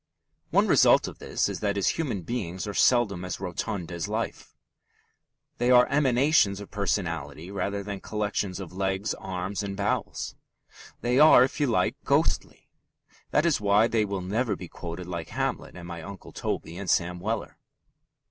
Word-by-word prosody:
One -, -, +4 dB
result -, -, +5 dB
of -, -, -9 dB
this -, -, 0 dB
is -, -, -4 dB
that 100 Hz, -1 st, 0 dB
his 100 Hz, -2 st, +2 dB
human 130 Hz, -, -2 dB
beings 95 Hz, -4 st, -3 dB
are 105 Hz, -, -4 dB
seldom 105 Hz, -6 st, +3 dB
as 90 Hz, -, -4 dB
rotund 90 Hz, 0 st, -4 dB
as 85 Hz, -2 st, -3 dB
life. -, -, -4 dB, 1.0 s
They 120 Hz, +1 st, +2 dB
are 125 Hz, -1 st, +7 dB
emanations 135 Hz, -6 st, +3 dB
of 100 Hz, -, -10 dB
personality 85 Hz, -5 st, -2 dB
rather 100 Hz, 0 st, -2 dB
than 100 Hz, -1 st, -5 dB
collections 100 Hz, -3 st, -2 dB
of 95 Hz, -3 st, -8 dB
legs, 95 Hz, +2 st, -1 dB
arms, 95 Hz, +1 st, -4 dB
and 100 Hz, -1 st, -5 dB
bowels. -, -, -2 dB, 0.7 s
They 125 Hz, +2 st, +2 dB
are, 150 Hz, -4 st, +8 dB
if 130 Hz, -, -2 dB
you 145 Hz, -, +2 dB
like, 115 Hz, -, +1 dB
ghostly. -, -, 0 dB, 0.6 s
That 150 Hz, -, +2 dB
is 160 Hz, -9 st, +2 dB
why 105 Hz, +2 st, +4 dB
they 115 Hz, -2 st, +1 dB
will 100 Hz, -2 st, -3 dB
never 105 Hz, +4 st, -1 dB
be 90 Hz, -, -8 dB
quoted 85 Hz, +1 st, -7 dB
like 85 Hz, -3 st, -5 dB
Hamlet -, -, -3 dB
and 85 Hz, -1 st, -9 dB
my 85 Hz, -1 st, -6 dB
Uncle 100 Hz, +3 st, -10 dB
Toby 85 Hz, +2 st, -4 dB
and 100 Hz, -, -5 dB
Sam 90 Hz, 0 st, +1 dB
Weller. -, -, -3 dB
100 Hz, 165 wpm, -27 LUFS, 90-115 Hz, 1.0 s, are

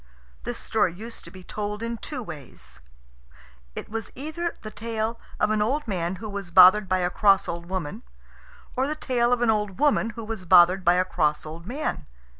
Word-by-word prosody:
This -, -, -3 dB
story -, -, +1 dB
used 225 Hz, +5 st, -7 dB
to -, -, -9 dB
be 185 Hz, -1 st, -12 dB
told 210 Hz, +3 st, -4 dB
in 230 Hz, 0 st, -3 dB
two 255 Hz, +2 st, -5 dB
ways. 150 Hz, -, -10 dB, 1.0 s
It -, -, -5 dB
was 225 Hz, +1 st, -5 dB
either 315 Hz, +5 st, -4 dB
the 215 Hz, -, -7 dB
tale 225 Hz, +1 st, -3 dB, 0.2 s
of 210 Hz, -, +2 dB
an 215 Hz, -1 st, +1 dB
old 270 Hz, +6 st, 0 dB
man 180 Hz, -3 st, -2 dB
who 215 Hz, +4 st, -7 dB
was 200 Hz, -3 st, -5 dB
bothered 185 Hz, +3 st, +7 dB
by 185 Hz, -, +3 dB
a 180 Hz, -1 st, 0 dB
cross 195 Hz, -1 st, +4 dB
old 170 Hz, 0 st, -5 dB
woman, 185 Hz, +2 st, -4 dB, 0.7 s
or 260 Hz, +2 st, +1 dB
the 305 Hz, -, -2 dB
tale 245 Hz, -5 st, +1 dB
of 245 Hz, -1 st, +2 dB
an 230 Hz, -, +4 dB
old 210 Hz, -3 st, -1 dB
woman 285 Hz, -5 st, +3 dB
who 230 Hz, -, -5 dB
was 215 Hz, -4 st, -5 dB
bothered 180 Hz, +3 st, +6 dB
by 175 Hz, 0 st, +5 dB
a 185 Hz, +1 st, +2 dB
cross 150 Hz, -5 st, 0 dB
old 165 Hz, +3 st, -9 dB
man. 245 Hz, -, -3 dB
210 Hz, 200 wpm, -25 LUFS, 180-230 Hz, 1.0 s, bothered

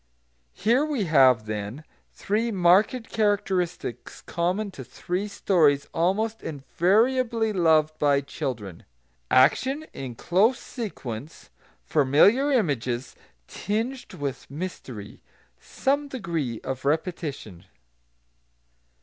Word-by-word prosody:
Here 240 Hz, +6 st, +2 dB
we 295 Hz, -8 st, -1 dB
have, 130 Hz, -, +4 dB
then, 105 Hz, +6 st, -5 dB, 0.3 s
three 220 Hz, +4 st, -1 dB
marked 205 Hz, +5 st, +3 dB
characteristics 190 Hz, -, -1 dB
common 185 Hz, +4 st, -1 dB
to 135 Hz, -, -9 dB
three 180 Hz, -, -4 dB
stories 160 Hz, -8 st, +2 dB
almost 210 Hz, +7 st, 0 dB
invariably 220 Hz, -, +1 dB
loved 155 Hz, -4 st, +3 dB
by 140 Hz, -1 st, +3 dB
children, 110 Hz, -9 st, -6 dB, 0.4 s
action, 260 Hz, -, +3 dB
in 130 Hz, -3 st, -6 dB
close 205 Hz, -, +2 dB
sequence; 150 Hz, -, -7 dB, 0.3 s
familiar 160 Hz, -, +4 dB
images, 135 Hz, -, -1 dB, 0.3 s
tinged 230 Hz, +6 st, -4 dB
with 140 Hz, -2 st, -5 dB
mystery; 140 Hz, -, -7 dB, 0.4 s
some 285 Hz, +2 st, -1 dB
degree 165 Hz, -, -3 dB
of 130 Hz, -1 st, -5 dB
repetition. 145 Hz, -, -3 dB
170 Hz, 90 wpm, -25 LUFS, 135-220 Hz, 0.4 s, have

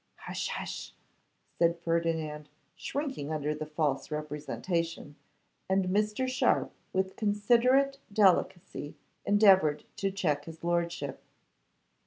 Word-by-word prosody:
'Hush, -, -, -4 dB
hush,' -, -, -5 dB, 0.7 s
said 170 Hz, 0 st, +3 dB
Ferdinand, 165 Hz, -3 st, -1 dB, 0.3 s
shrinking 270 Hz, -, -4 dB
under 150 Hz, -1 st, -1 dB
this 155 Hz, 0 st, -6 dB
false 150 Hz, -3 st, -1 dB
representation, 150 Hz, +1 st, -3 dB, 0.5 s
and 190 Hz, -1 st, +2 dB
Mr. 210 Hz, +6 st, +1 dB
Sharpe 255 Hz, -, +1 dB, 0.2 s
with 190 Hz, 0 st, -1 dB
considerate 240 Hz, +6 st, +3 dB
delicacy 185 Hz, -6 st, +2 dB, 0.3 s
endeavoured 190 Hz, -7 st, +5 dB
to 195 Hz, -, 0 dB
check 160 Hz, -7 st, -1 dB
his 165 Hz, 0 st, -10 dB
lordship. 170 Hz, -5 st, -1 dB
170 Hz, 100 wpm, -30 LUFS, 150-205 Hz, 0.7 s, endeavoured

